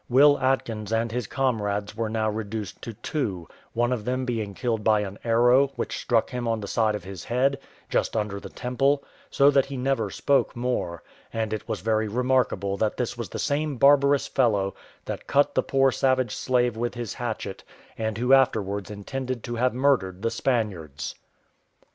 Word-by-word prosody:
Will 145 +3 +6
Atkins 115 -5 -1
and 115 0 0
his 120 -3 -3
comrades 105 -6 -1
were 115 0 -2
now 110 0 0
reduced 105 -1 -4
to 115 - -6
two; 105 - -3 0.3
one 120 +2 +1
of 115 -4 -3
them 130 +2 -1
being 110 -5 -3
killed 115 -2 -1
by 105 -1 +4
an 100 0 -6
arrow, 120 +4 +5
which - - -3
struck 115 -2 +1
him 125 -2 -3
on 115 -1 0
the 100 - -6
side 110 0 +1
of 105 - -6
his 95 -2 -8
head, 135 +3 +1 0.3
just - - 0
under 105 -2 -2
the - - -9
temple, 135 +3 0 0.3
so 140 +1 +5
that 135 -2 +3
he 135 -1 -5
never 125 -5 0
spoke 140 +7 +1
more; 120 -9 -2 0.3
and 110 -1 -2
it 110 +1 -5
was 110 - -2
very 110 +1 +1
remarkable 120 -4 +1
that 110 +1 0
this 120 -1 -2
was 115 -5 -5
the - - -6
same 145 -1 -1
barbarous 140 +1 +5
fellow 105 -7 +1 0.3
that - - -6
cut 145 +1 +3
the - - +3
poor 135 0 +3
savage 130 -3 +1
slave 125 -2 +1
with 120 +2 -2
his 120 -3 -4
hatchet, 110 -5 -5 0.3
and 110 -1 -2
who 125 +3 +3
afterwards 100 -7 +2
intended 125 +4 -4
to 120 - -4
have 125 +2 +2
murdered 120 -9 +1
the 115 - +1
Spaniards. 105 - -2
115 Hz, 185 wpm, -25 LUFS, 105-130 Hz, 0.3 s, Will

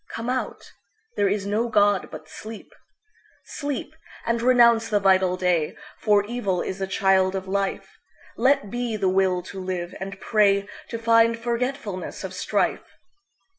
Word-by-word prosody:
Come 230 +2 -4
out; 255 -4 -4 0.4
there 200 - +2
is 200 0 -1
no 215 +4 0
God 205 -3 +3
but 155 0 -10
Sleep.Sleep, 285 - -9 0.3
and 230 0 0
renounce 235 -2 +5
the 210 -2 +2
vital 190 -2 +3
day; 180 -4 0 0.2
For 205 -2 +3
evil 205 -6 -1
is 190 - -5
the 195 - -2
child 190 0 +2
of 190 0 -4
life. 195 0 -3 0.4
Let 245 -5 +2
be 240 -2 -2
the 195 -2 +1
will 185 -1 +1
to 190 +1 -8
live, 180 -1 -4
and 195 0 -6
prayTo 205 +1 0
find 230 0 +4
forgetfulness 235 -4 -3
of - - -5
strife. - - -1
205 Hz, 140 wpm, -24 LUFS, 190-230 Hz, 0.4 s, renounce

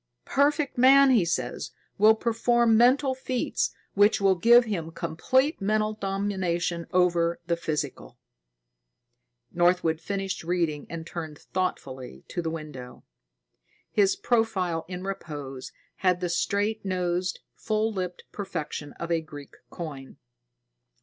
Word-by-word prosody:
Perfect 285 -1 +1
man, 270 +2 +7
he 230 -7 +5
says, 130 -8 -2 0.3
will 215 +2 +7
perform 235 0 +2
mental 260 +4 +4
feats 255 -1 -1 0.2
which 205 +2 +4
will 195 -1 +4
give 235 +7 +6
him 175 -7 -3
complete 260 - 0
mental 215 +2 +1
domination 190 -4 -2
over 170 -2 +2
the 170 -1 +1
physical." 155 - -4 1.3
Northwood 175 -2 +2
finished 195 0 -3
reading 165 -4 -1
and 165 -1 -6
turned 160 -3 -6
thoughtfully 135 -10 -4
to 175 - -3
the 165 - -2
window. 150 -6 -8 0.9
His 200 -2 +3
profile 190 -8 0
in 180 0 -6
repose 145 -9 -6 0.3
had 180 -2 +2
the 180 -1 -2
straight 205 +5 0
nosed, 180 -1 -1
full 220 0 -1
lipped 180 -2 -4
perfection 155 -7 -5
of 170 0 -6
a 165 -1 +2
Greek 145 -3 -11
coin. 140 -6 -8
180 Hz, 120 wpm, -26 LUFS, 165-215 Hz, 1.3 s, man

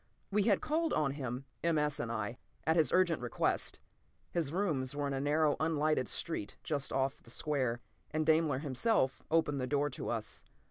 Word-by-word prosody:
We 210 +1 +3
had 205 -4 +4
called 320 +1 +1
on 150 -3 +2
him, 130 -2 -4 0.2
M. 165 -1 +3
S. 150 -1 +1
and 115 - -2
I, 115 +1 -3 0.3
at 160 - +3
his 160 -3 +3
urgent 180 -5 +3
request. 120 -2 0 0.5
His 160 -5 -1
rooms 155 -8 0
were 145 0 -1
in 140 - -1
a 135 - -1
narrow, 150 +1 +3
unlighted 155 -4 +2
street 160 -11 -3
just 145 -3 -2
off 135 +1 0
the - - -17
square, 125 -3 -1 0.3
and 155 +1 0
Daimler 155 -3 +4
himself 135 - +1
opened 150 -4 +2
the 130 - -1
door 145 +1 +1
to - - -5
us. - - -4
145 Hz, 185 wpm, -33 LUFS, 130-160 Hz, 0.5 s, had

